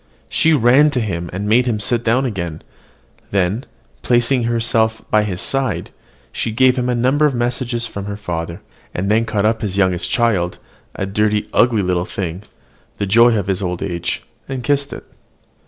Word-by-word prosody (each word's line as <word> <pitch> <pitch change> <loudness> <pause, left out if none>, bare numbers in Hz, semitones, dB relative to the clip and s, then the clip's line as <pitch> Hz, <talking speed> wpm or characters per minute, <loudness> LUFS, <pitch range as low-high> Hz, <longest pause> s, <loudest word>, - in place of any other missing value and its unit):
She 165 - +2
ran 135 +3 +5
to - - +3
him, 85 -7 -3
and 100 +3 -4
made 120 +4 +3
him 110 -3 0
sit 115 +3 -1
down 125 +4 +2
again; 85 -9 -4 0.7
then, 100 +5 0 0.3
placing 120 0 +2
herself 115 -1 +1
by 105 - +5
his 95 -4 -3
side, 135 -1 -1 0.4
she - - -2
gave 130 +3 +4
him 125 -1 -1
a 125 - +1
number 130 +5 +3
of 140 - -2
messages 120 0 -1
from 100 -3 -6
her 100 0 -5
father, 85 -4 -5 0.3
and 100 +3 -1
then 110 +2 +3
caught 105 -2 0
up 110 +1 +1
his 100 -3 -2
youngest 90 -3 +1
child, 105 -8 +1 0.4
a 100 - -2
dirty, 105 +1 0
ugly 115 -4 +3
little 90 -1 0
thing, 90 -1 -4 0.6
the 100 - -1
joy 115 +3 +5
of 100 - -1
his 95 0 -1
old 90 -2 -2
age, 85 -3 -3 0.3
and 130 -2 -4
kissed 140 +2 0
it. - - -7
110 Hz, 180 wpm, -19 LUFS, 95-120 Hz, 0.7 s, ran